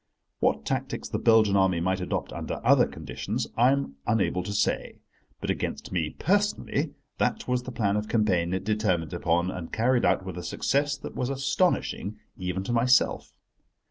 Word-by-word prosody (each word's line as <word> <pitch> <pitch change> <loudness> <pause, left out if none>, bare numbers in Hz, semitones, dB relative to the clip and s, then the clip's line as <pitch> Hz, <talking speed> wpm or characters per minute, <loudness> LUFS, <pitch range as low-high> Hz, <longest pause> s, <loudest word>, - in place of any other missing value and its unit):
What - - +1
tactics - - -2
the - - -2
Belgian 110 -3 +5
Army 95 -3 +3
might 95 +2 0
adopt 90 - -3
under - - -4
other - - +6
conditions 70 -6 -4
I 120 +3 +5
am 140 - -1
unable 100 -4 +1
to 100 - -5
say, 100 - -1 0.4
but - - -1
against - - -4
me 80 -5 -1
personally 205 +4 0 0.2
that - - 0
was 125 0 +1
the 130 - -7
plan 105 -4 0
of 105 0 -2
campaign 95 -6 +2
it 95 0 -1
determined 95 -7 0
upon 85 +2 +1
and 85 -3 -7
carried 120 +2 +2
out 95 - +2
with 90 -2 -5
a - - -7
success 145 +7 0
that - - -8
was 125 - -2
astonishing, 135 - 0 0.2
even 90 0 -3
to 120 - -2
myself. 125 +2 +2
105 Hz, 175 wpm, -27 LUFS, 90-125 Hz, 0.4 s, other